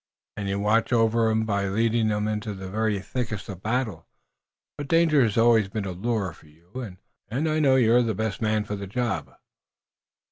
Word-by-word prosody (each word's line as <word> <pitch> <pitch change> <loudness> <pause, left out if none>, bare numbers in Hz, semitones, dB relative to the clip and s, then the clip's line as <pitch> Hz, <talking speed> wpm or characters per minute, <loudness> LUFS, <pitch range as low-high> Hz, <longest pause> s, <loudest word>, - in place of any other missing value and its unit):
"And 100 -1 -4
you 100 0 -1
watch 110 +4 +2
over 115 -1 +3
'em 110 0 +1
by 100 -2 0
leading 110 +2 +1
'em 105 0 -1
into 105 -1 -3
the 95 -1 -8
very 110 0 0
thickest 110 -1 -4
of 95 - -6
the - - -23
battle. 110 -6 -2 0.7
But 145 - -6
danger 165 -3 +4
has 110 -4 +1
always 115 -3 +4
been 105 0 -3
a 95 - -3
lure 100 -1 -2
for - - -19
you, 80 +4 -24 0.6
and 135 +8 -1
I 155 0 +1
know 135 -3 +4
you're 120 -1 +5
the 115 -3 -1
best 110 0 -3
man 110 -1 +1
for 105 0 -4
the 100 -1 -6
job." 120 +3 -2
110 Hz, 200 wpm, -25 LUFS, 100-120 Hz, 0.7 s, you're